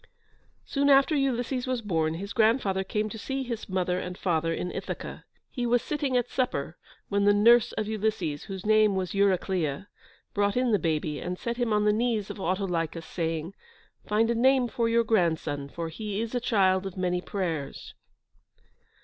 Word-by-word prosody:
Soon 280 0 +1
after 275 +3 +5
Ulysses 255 -2 0
was 255 -2 -1
born, 160 -5 0
his 200 +4 -6
grandfather 215 -4 +2
came 210 +2 -1
to 220 - -7
see 270 +4 -3
his 235 -4 -5
mother 185 -1 0
and 180 0 -6
father 165 -2 0
in 180 +2 -3
Ithaca. - - -6 0.3
He 245 -2 -2
was 240 0 +2
sitting 280 -2 0
at 245 -1 0
supper 170 - -2 0.3
when 200 0 +1
the 205 0 +5
nurse 235 +3 +5
of 215 - -2
Ulysses, 210 -9 -2
whose 190 -1 -7
name 215 -1 +4
was 185 -2 -2
Eurycleia, 190 -4 0 0.4
brought 205 +1 +1
in 250 -1 +2
the 205 - +3
baby, 155 -2 -1
and 180 0 -4
set 235 +3 -4
him 240 -2 0
on 210 0 +2
the 210 - +4
knees 220 -2 0
of - - -9
Autolycus, 175 -3 -2
saying, 165 +1 -3 0.5
"Find 225 +2 +2
a - - +2
name 255 +2 +3
for 230 0 0
your 230 0 +3
grandson, 160 -9 0
for 165 +2 -5
he 205 +4 -4
is 230 +1 -3
a 245 - +1
child 195 -5 +2
of 190 - -9
many 180 -1 0
prayers." 165 -8 -4
205 Hz, 180 wpm, -27 LUFS, 180-235 Hz, 0.5 s, after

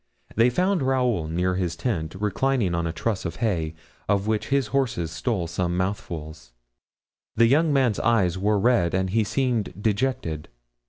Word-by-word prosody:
They 115 +3 +5
found 180 +6 +1
Raoul 125 -10 +1
near 90 +3 0
his 90 -3 -1
tent, 85 -4 -2
reclining 105 +1 0
on 85 -1 0
a - - -1
truss 105 +4 -2
of 85 -3 -4
hay, 80 -6 -1 0.3
of 100 -1 +2
which 110 0 -1
his 135 -3 +1
horse 130 -3 +1
stole 85 +3 -1
some 85 +1 -2
mouthfuls; 80 -8 -4 0.8
the 115 - +5
young 150 +6 +3
man's 130 -7 +2
eyes 100 -7 +2
were 105 +3 +1
red 95 -5 +2
and 95 0 0
he 110 +2 +2
seemed 110 -4 -1
dejected. 105 - -1
105 Hz, 160 wpm, -25 LUFS, 85-125 Hz, 0.8 s, They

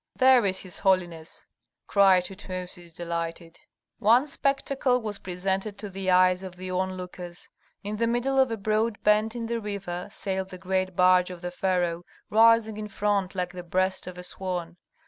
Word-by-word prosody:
"There 255 -4 +5
is 190 0 -1
his 185 -2 -7
holiness!" 175 -4 -1 0.4
cried 190 -3 +4
Tutmosis, 180 -2 -7
delighted. 170 0 -5 0.4
One 235 +6 +5
spectacle 275 -3 0
was 215 -3 -5
presented 190 +3 -2
to 205 -2 -7
the 190 0 -3
eyes 185 0 +4
of 185 -2 -8
the 185 0 -6
onlookers: 180 -1 -5 0.3
in 210 +1 -4
the 230 +1 +1
middle 250 +3 +1
of 265 -1 +4
a 225 - -3
broad 215 +1 0
bend 215 +2 +3
in 235 -1 -3
the 230 0 -2
river 200 -4 -5
sailed 190 -1 -3
the 185 - -8
great 185 0 -1
barge 180 0 +5
of 180 -2 -9
the 180 - -3
pharaoh, 175 -2 0 0.3
rising 225 0 +5
in 215 0 -5
front 200 -2 -1
like 180 -1 -2
the 180 - -6
breast 185 +2 -1
of 180 -1 -7
a 180 - -7
swan. 180 -2 -4
190 Hz, 170 wpm, -26 LUFS, 180-215 Hz, 0.4 s, There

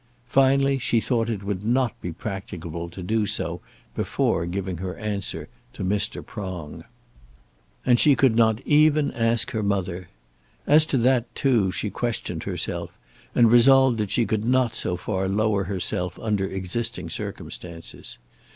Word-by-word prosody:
Finally, 135 +1 +3
she 120 -1 +1
thought 115 0 0
it 105 -4 -3
would 100 -1 -3
not 120 +1 +1
be 90 - -4
practicable 85 -3 -6
to 90 +2 -9
do 110 +3 0
so - - -1 0.3
before 85 +1 0
giving 95 0 -3
her 90 +1 -5
answer 105 -2 -3 0.3
to - - -6
Mr. 100 +3 0
Prong. 95 -7 -7 1.0
And 120 -1 +4
she 145 -2 +5
could 130 -3 +3
not 110 0 +3
even 150 -1 +4
ask 115 -1 +1
her 110 -3 -2
mother. 95 -3 -2 0.6
As 155 +1 +5
to 135 - +1
that, 125 -1 +1
too, 115 -9 +2
she 100 +2 -3
questioned 120 -3 -3
herself, - - -4 0.4
and 115 -2 +5
resolved 130 0 +6
that 105 -2 -1
she 120 - +2
could 110 +1 -1
not 125 0 +2
so 90 -6 0
far 95 +1 -2
lower 100 0 +1
herself 90 -2 -1
under 105 -3 -1
existing 105 +6 -3
circumstances. 85 -2 -6
110 Hz, 150 wpm, -24 LUFS, 95-120 Hz, 1.0 s, resolved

